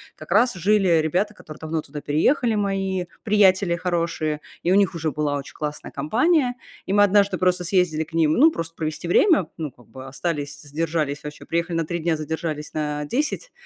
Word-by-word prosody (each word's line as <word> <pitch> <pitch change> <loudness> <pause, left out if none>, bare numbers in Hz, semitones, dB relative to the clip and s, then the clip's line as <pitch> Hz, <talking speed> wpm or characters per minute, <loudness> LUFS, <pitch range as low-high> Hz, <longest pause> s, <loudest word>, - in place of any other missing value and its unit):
как 155 - -12
раз 235 +6 +4
жили 190 -2 +3
ребята, 180 +7 0
которые 155 -7 -12
давно 160 0 -3
туда 150 0 -8
переехали, 220 - +2
мои 195 -2 -1 0.2
приятели 195 -4 +4
хорошие, 170 -3 -1 0.2
и 175 - +2
у - - +5
них 200 -3 +3
уже 160 -1 -1
была 150 0 -1
очень 140 -1 -6
классная 150 0 -5
компания. 245 - +1 0.3
И 190 - -2
мы 205 0 +6
однажды 200 0 +3
просто 180 -1 +1
съездили 175 -3 +1
к 160 - -17
ним, 160 -2 +3
ну, 310 - +6
просто 165 - -5
провести 155 +1 -4
время, 335 - +4
ну, 155 -4 -4
как 120 -3 -21
бы 130 0 -11
остались, 145 +1 -4
задержались, 150 -1 -2
вообще 150 0 -8
приехали 170 0 -1
на 165 - 0
3 170 +2 -3
дня, 165 -1 0
задержались 155 0 -4
на 150 -1 -2
10, 300 - -2
165 Hz, 190 wpm, -23 LUFS, 150-195 Hz, 0.3 s, мы